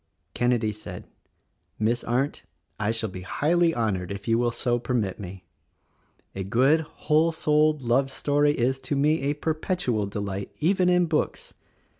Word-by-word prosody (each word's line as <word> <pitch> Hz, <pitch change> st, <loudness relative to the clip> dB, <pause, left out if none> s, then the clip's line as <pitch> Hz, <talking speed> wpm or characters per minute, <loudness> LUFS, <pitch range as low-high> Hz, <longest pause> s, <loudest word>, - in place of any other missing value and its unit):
Kenedy 120 Hz, -3 st, +1 dB
said, 105 Hz, -, -9 dB, 0.7 s
"Miss 115 Hz, +3 st, 0 dB
Arndt, 130 Hz, +5 st, -1 dB, 0.4 s
I 105 Hz, -, 0 dB
shall 115 Hz, 0 st, 0 dB
be 90 Hz, -, -7 dB
highly 165 Hz, -, +2 dB
honored 100 Hz, -, -1 dB
if 100 Hz, 0 st, -7 dB
you 115 Hz, 0 st, +3 dB
will 120 Hz, 0 st, +2 dB
so 120 Hz, +1 st, 0 dB
permit 115 Hz, -6 st, -2 dB
me. 95 Hz, -1 st, -8 dB, 0.9 s
A 95 Hz, -, -4 dB
good, 130 Hz, -, +3 dB
whole 155 Hz, +1 st, +1 dB
souled, 150 Hz, -2 st, +2 dB
love 130 Hz, +3 st, +2 dB
story 145 Hz, +2 st, +2 dB
is, 130 Hz, 0 st, 0 dB
to 145 Hz, -, -3 dB
me, 150 Hz, +3 st, +2 dB
a 140 Hz, +2 st, 0 dB
perpetual 155 Hz, -, -1 dB
delight, 100 Hz, -1 st, -4 dB
even 180 Hz, +3 st, +3 dB
in 180 Hz, 0 st, +4 dB
books. 155 Hz, -2 st, -2 dB
125 Hz, 150 wpm, -26 LUFS, 110-150 Hz, 0.9 s, in